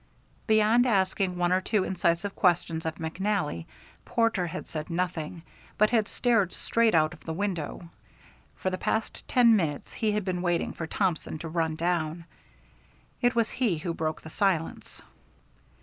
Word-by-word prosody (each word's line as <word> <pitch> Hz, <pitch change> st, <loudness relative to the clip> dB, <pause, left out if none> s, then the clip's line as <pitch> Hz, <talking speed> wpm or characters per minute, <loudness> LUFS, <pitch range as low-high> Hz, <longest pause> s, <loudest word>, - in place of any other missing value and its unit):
Beyond 220 Hz, +3 st, +4 dB
asking 190 Hz, -3 st, +1 dB
one 175 Hz, 0 st, +1 dB
or 185 Hz, +1 st, +3 dB
two 205 Hz, 0 st, +1 dB
incisive 185 Hz, +2 st, 0 dB
questions 165 Hz, -3 st, +1 dB
of 160 Hz, -, -2 dB
McNally, 165 Hz, -, -2 dB, 0.4 s
Porter 230 Hz, -6 st, +1 dB
had 180 Hz, +3 st, -6 dB
said 155 Hz, +1 st, -5 dB
nothing, 170 Hz, -1 st, -3 dB, 0.3 s
but 215 Hz, +1 st, +4 dB
had 220 Hz, -4 st, +3 dB
stared 225 Hz, -7 st, +1 dB
straight 230 Hz, -4 st, +2 dB
out 155 Hz, +1 st, +3 dB
of 165 Hz, -, -15 dB
the 160 Hz, -, -4 dB
window. 175 Hz, -3 st, -3 dB, 0.7 s
For 185 Hz, -, -2 dB
the 185 Hz, -, -3 dB
past 220 Hz, -, -2 dB
ten 235 Hz, -3 st, +5 dB
minutes 155 Hz, -8 st, -2 dB
he 215 Hz, -2 st, 0 dB
had 210 Hz, -2 st, -1 dB
been 180 Hz, -2 st, -1 dB
waiting 175 Hz, -2 st, 0 dB
for 165 Hz, -, -5 dB
Thompson 175 Hz, -4 st, -1 dB
to 165 Hz, -, -6 dB
run 160 Hz, -1 st, 0 dB
down. 170 Hz, -1 st, -1 dB, 1.0 s
It 245 Hz, 0 st, +3 dB
was 230 Hz, -2 st, +2 dB
he 235 Hz, -10 st, +1 dB
who 170 Hz, +2 st, -3 dB
broke 155 Hz, -1 st, -3 dB
the 160 Hz, -, -9 dB
silence. 180 Hz, -5 st, -1 dB
180 Hz, 160 wpm, -28 LUFS, 165-210 Hz, 1.0 s, ten